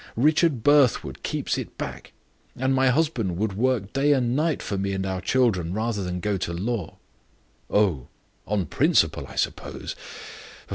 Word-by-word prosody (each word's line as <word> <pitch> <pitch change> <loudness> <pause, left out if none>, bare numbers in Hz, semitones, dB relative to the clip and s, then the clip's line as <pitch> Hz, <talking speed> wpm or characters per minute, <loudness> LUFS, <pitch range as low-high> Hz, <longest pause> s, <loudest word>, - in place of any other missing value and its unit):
Richard 150 -1 +3
Brithwood 145 -3 +3
keeps - - -2
it - - -8
back; - - -6 0.4
and 130 +1 0
my 130 0 +4
husband 125 - 0
would 105 +1 -1
work 110 -2 0
day 145 +2 +3
and 125 -3 +1
night 155 +1 0
for 100 - -3
me 100 0 -1
and 95 0 -2
our 95 -1 -2
children 95 -6 +1
rather 110 -2 -1
than 90 0 -3
go 105 +1 -1
to 85 - -3
law." 100 0 -3 0.7
"Oh! 95 -12 +2 0.4
on 100 -3 0
principle, - - +2
I - - -11
suppose? - - -3
110 Hz, 155 wpm, -25 LUFS, 95-130 Hz, 0.7 s, my